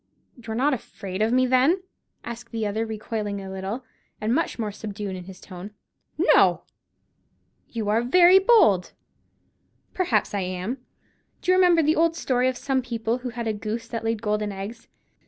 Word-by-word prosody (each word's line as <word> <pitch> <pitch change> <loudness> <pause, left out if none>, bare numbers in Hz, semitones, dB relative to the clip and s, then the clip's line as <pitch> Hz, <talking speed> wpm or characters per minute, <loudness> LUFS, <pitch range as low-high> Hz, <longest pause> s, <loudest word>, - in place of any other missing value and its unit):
"You're 225 -3 -7
not 275 +5 +2
afraid 200 -5 -5
of 220 +1 +2
me, 255 +1 +4
then?" 265 +9 +3 0.4
asked 235 0 -8
the 225 -1 -2
other, 220 +2 -1
recoiling 215 -2 -4
a 190 -1 -7
little, 195 +7 -5 0.3
and 215 +2 0
much 330 +5 0
more 215 -3 -2
subdued 205 -2 -6
in 180 -1 -8
his 190 0 -11
tone. 190 +2 -10 0.4
"No!" - - +4 1.1
"You 225 -3 -4
are 220 +2 +3
very 355 +9 +6
bold." 380 - +4 1.0
"Perhaps 235 - +1
I 200 - 0
am. 185 +7 -3 0.6
Do 365 - +2
you - - +5
remember 355 -3 +5
the 310 +2 +3
old 330 0 +2
story 255 -5 +1
of 255 - -4
some 270 -2 0
people 235 -1 -2
who 250 0 -5
had 235 0 -5
a 220 - 0
goose 220 +2 -4
that 230 -2 -4
laid 225 -1 -1
golden 210 -1 0
eggs? 200 +4 -7
225 Hz, 175 wpm, -25 LUFS, 210-255 Hz, 1.1 s, very